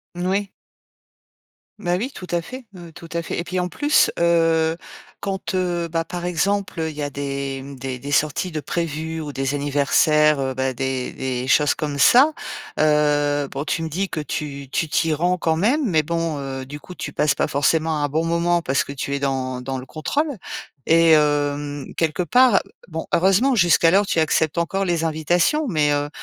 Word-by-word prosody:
Mmh, 175 Hz, +1 st, -3 dB
oui. 195 Hz, +1 st, 0 dB, 1.3 s
Bah, 175 Hz, -3 st, 0 dB
oui, 255 Hz, +7 st, -3 dB
tout 185 Hz, -, -9 dB
à 175 Hz, -, +1 dB
fait, 255 Hz, +8 st, -9 dB
heu, 170 Hz, -2 st, -11 dB
tout 165 Hz, +1 st, -12 dB
à 170 Hz, -, -1 dB
fait -, -, -4 dB
et 170 Hz, -, -2 dB
puis, 185 Hz, +1 st, -3 dB
en 180 Hz, -, 0 dB
plus, 290 Hz, -, +2 dB
heu, 165 Hz, -1 st, +3 dB, 0.4 s
quand, 195 Hz, -1 st, -3 dB
heu, 175 Hz, -2 st, -1 dB
bah, 165 Hz, 0 st, -1 dB
par 175 Hz, 0 st, -5 dB
exemple, 195 Hz, +1 st, -1 dB
heu, 160 Hz, -, -1 dB
il 150 Hz, -, -13 dB
y 150 Hz, -, -5 dB
a 145 Hz, -, -2 dB
des, 140 Hz, -1 st, -4 dB
mmh, 140 Hz, +1 st, -9 dB
des 130 Hz, -1 st, -4 dB
des 140 Hz, +3 st, -7 dB
sorties 155 Hz, +5 st, +1 dB
de 155 Hz, -, -3 dB
prévues 160 Hz, +1 st, -3 dB
ou 150 Hz, -2 st, -6 dB
des 135 Hz, +1 st, -1 dB
anniversaires, 145 Hz, +1 st, +3 dB
heu, 135 Hz, -1 st, -1 dB
bah, 130 Hz, 0 st, -1 dB
des 130 Hz, 0 st, -3 dB
des 130 Hz, -1 st, -3 dB
choses 150 Hz, +1 st, +4 dB
comme 145 Hz, -2 st, -4 dB
ça, 270 Hz, -, +6 dB, 0.5 s
heu, 145 Hz, -1 st, +2 dB
bon, 140 Hz, -, -4 dB
tu 165 Hz, -, -2 dB
me 160 Hz, -, -3 dB
dis 190 Hz, +5 st, -2 dB
que 155 Hz, -, -4 dB
tu 140 Hz, -2 st, -5 dB
tu 165 Hz, +3 st, -1 dB
t'y 160 Hz, +1 st, +1 dB
rends 175 Hz, +4 st, +1 dB
quand 160 Hz, -1 st, +1 dB
même, 245 Hz, -, +1 dB
mais 160 Hz, -3 st, +2 dB
bon, 165 Hz, -1 st, -2 dB
heu, 135 Hz, -1 st, -5 dB
du 145 Hz, +1 st, -8 dB
coup, 180 Hz, -, -11 dB
tu -, -, -6 dB
passes 150 Hz, -1 st, +2 dB
pas -, -, 0 dB
forcément 155 Hz, +2 st, +1 dB
un 145 Hz, -, 0 dB
bon 160 Hz, +3 st, 0 dB
moment 170 Hz, +1 st, +1 dB
parce 135 Hz, -3 st, +1 dB
que -, -, -8 dB
tu 140 Hz, 0 st, -3 dB
es 140 Hz, -, -2 dB
dans 130 Hz, -2 st, -2 dB
dans 135 Hz, +1 st, -4 dB
le 130 Hz, -, -9 dB
contrôle 285 Hz, -, -1 dB, 0.6 s
et 165 Hz, 0 st, +5 dB
hem, 145 Hz, -1 st, +1 dB
quelque 165 Hz, +2 st, 0 dB
part, 245 Hz, +4 st, +4 dB, 0.3 s
bon, 160 Hz, -1 st, -4 dB
heureusement, 195 Hz, +9 st, +3 dB
jusqu'alors, 175 Hz, +1 st, +4 dB
tu 170 Hz, -, 0 dB
acceptes 160 Hz, 0 st, +1 dB
encore 195 Hz, +3 st, -1 dB
les 170 Hz, -2 st, 0 dB
invitations, 175 Hz, -, +1 dB
mais, 150 Hz, -7 st, +2 dB
heu, 145 Hz, 0 st, -1 dB
160 Hz, 200 wpm, -22 LUFS, 145-175 Hz, 1.3 s, ça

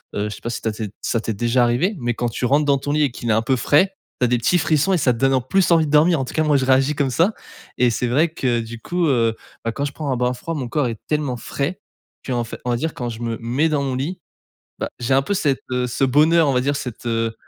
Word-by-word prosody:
heu, 100 Hz, -, -1 dB
je 105 Hz, -, -6 dB
sais -, -, -14 dB
pas 120 Hz, -, -4 dB
si 120 Hz, -, -4 dB
ta 110 Hz, -, -1 dB
t'es 110 Hz, 0 st, -5 dB
si 100 Hz, -, -8 dB, 0.2 s
ça 115 Hz, -, +1 dB
t'es 110 Hz, -, -2 dB
déjà 120 Hz, +3 st, +2 dB
arrivée, 150 Hz, -, +1 dB
mais 120 Hz, -1 st, -1 dB
quand 120 Hz, -1 st, -1 dB
tu 125 Hz, -, -3 dB
rentres 145 Hz, +4 st, +3 dB
dans 140 Hz, -1 st, +3 dB
ton 145 Hz, +2 st, -2 dB
lit 150 Hz, 0 st, +2 dB
et 135 Hz, -, +1 dB
qu'il 120 Hz, -1 st, -5 dB
est -, -, +4 dB
un 110 Hz, -, +2 dB
peu 130 Hz, +2 st, +2 dB
frais, 170 Hz, +11 st, +3 dB, 0.3 s
tu -, -, +5 dB
as -, -, +2 dB
des 125 Hz, 0 st, +2 dB
petits 175 Hz, +10 st, +2 dB
frissons 160 Hz, +5 st, +2 dB
et -, -, +3 dB
ça 125 Hz, -5 st, +2 dB
te 115 Hz, -, -7 dB
donne 135 Hz, 0 st, +3 dB
en 130 Hz, -, +2 dB
plus 185 Hz, +9 st, +1 dB
envie 165 Hz, -2 st, +5 dB
de -, -, -4 dB
dormir. 155 Hz, +1 st, +4 dB
En 130 Hz, -, -1 dB
tout -, -, -8 dB
cas, 155 Hz, -, +1 dB
moi 150 Hz, -2 st, +3 dB
je 130 Hz, -, 0 dB
réagis 135 Hz, +3 st, +3 dB
comme 140 Hz, -3 st, 0 dB
ça 180 Hz, -, +2 dB, 0.4 s
et 125 Hz, -1 st, +4 dB
c'est 125 Hz, +2 st, -1 dB
vrai 150 Hz, +7 st, +2 dB
que 125 Hz, -7 st, -1 dB
du 115 Hz, 0 st, -8 dB
coup, 175 Hz, -1 st, -1 dB
heu, 115 Hz, -4 st, +2 dB, 0.3 s
bah, 115 Hz, -, 0 dB
quand 140 Hz, +3 st, -2 dB
je 140 Hz, -, -3 dB
prends 145 Hz, -4 st, -3 dB
un 125 Hz, -, 0 dB
bain 125 Hz, 0 st, +1 dB
froid, 165 Hz, +6 st, -5 dB
mon 130 Hz, -4 st, -3 dB
corps 145 Hz, -2 st, 0 dB
est 115 Hz, -2 st, -4 dB
tellement 145 Hz, -5 st, -1 dB
frais 140 Hz, +9 st, -3 dB, 0.5 s
qu'en 120 Hz, -2 st, -1 dB
fai -, -, -8 dB
on 125 Hz, -, 0 dB
va -, -, +2 dB
dire 160 Hz, +5 st, -2 dB
quand 120 Hz, -1 st, -3 dB
je 115 Hz, 0 st, -7 dB
me 115 Hz, -1 st, -2 dB
mets 130 Hz, +8 st, 0 dB
dans 145 Hz, -2 st, 0 dB
mon 135 Hz, -1 st, -2 dB
lit, 160 Hz, +8 st, -3 dB, 0.6 s
bah, -, -, -3 dB
j'ai 125 Hz, +2 st, +1 dB
un 135 Hz, -, +4 dB
peu 200 Hz, -, -3 dB
cette, 145 Hz, -8 st, 0 dB
heu, 125 Hz, 0 st, 0 dB
ce 125 Hz, +2 st, 0 dB
bonheur, 155 Hz, +4 st, +4 dB
on -, -, +2 dB
va 125 Hz, -, +3 dB
dire 140 Hz, +2 st, 0 dB
cette, 120 Hz, -2 st, -6 dB
heu, 115 Hz, -1 st, -1 dB
130 Hz, 310 wpm, -21 LUFS, 120-150 Hz, 0.6 s, tu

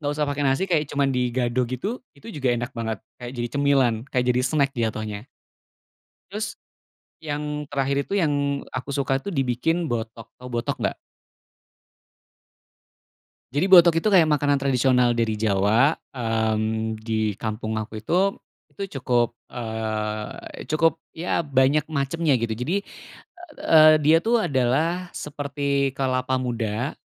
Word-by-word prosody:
nggak 145 Hz, -1 st, -1 dB
usah 150 Hz, -, +1 dB
pakai 145 Hz, 0 st, -3 dB
nasi, 135 Hz, +7 st, +1 dB
kayak 160 Hz, -6 st, 0 dB
cuma 140 Hz, -1 st, 0 dB
digado 125 Hz, -2 st, 0 dB
gitu. 195 Hz, -, -4 dB, 0.2 s
Itu 225 Hz, +1 st, -11 dB
juga 135 Hz, -6 st, -1 dB
enak 120 Hz, +3 st, -4 dB
banget, 115 Hz, -3 st, -3 dB, 0.2 s
kayak 120 Hz, 0 st, -6 dB
jadi 120 Hz, 0 st, -2 dB
cemilan, 140 Hz, -4 st, +3 dB
kayak 125 Hz, -2 st, 0 dB
jadi 125 Hz, -, +1 dB
snack 135 Hz, +2 st, +1 dB
jatohnya. 110 Hz, -2 st, -3 dB, 1.0 s
Terus, 210 Hz, +2 st, -5 dB, 0.6 s
yang 150 Hz, -1 st, -3 dB
terakhir 140 Hz, 0 st, 0 dB
itu -, -, -10 dB
yang 145 Hz, -3 st, 0 dB
aku 130 Hz, +2 st, -5 dB
suka 135 Hz, -1 st, 0 dB
tuh, 200 Hz, +9 st, -6 dB
dibikin 150 Hz, +5 st, 0 dB
botok. 115 Hz, -2 st, -4 dB
Tahu 125 Hz, -, -10 dB
botok 120 Hz, 0 st, -1 dB
nggak? -, -, 0 dB, 2.6 s
Jadi, 145 Hz, +6 st, +1 dB
botok 175 Hz, -3 st, +7 dB
itu 165 Hz, +6 st, +2 dB
kayak 170 Hz, -5 st, +6 dB
makanan 145 Hz, -2 st, +2 dB
tradisional 125 Hz, -2 st, +3 dB
dari 115 Hz, -1 st, +1 dB
Jawa. 110 Hz, +6 st, +2 dB, 0.2 s
Mmm, 110 Hz, -2 st, -1 dB
di 110 Hz, -1 st, -1 dB
kampung 110 Hz, 0 st, -3 dB
aku 110 Hz, 0 st, -7 dB
itu, 180 Hz, -, +1 dB, 0.3 s
itu 195 Hz, -9 st, -6 dB
cukup, 120 Hz, -2 st, +1 dB, 0.2 s
eee, 110 Hz, -2 st, -5 dB
cukup 165 Hz, +1 st, +2 dB, 0.2 s
ya, 170 Hz, +1 st, 0 dB
banyak 145 Hz, 0 st, +2 dB
macamnya, 150 Hz, 0 st, +1 dB
gitu. 115 Hz, -1 st, -2 dB
Jadi, 160 Hz, -, -2 dB, 0.7 s
eee, 155 Hz, -1 st, +6 dB
dia 160 Hz, +2 st, +6 dB
tuh 230 Hz, +6 st, +2 dB
adalah 150 Hz, +8 st, 0 dB
seperti 140 Hz, -2 st, -2 dB
kelapa 130 Hz, -1 st, 0 dB
muda. 120 Hz, 0 st, -2 dB
135 Hz, 135 wpm, -24 LUFS, 115-150 Hz, 2.6 s, botok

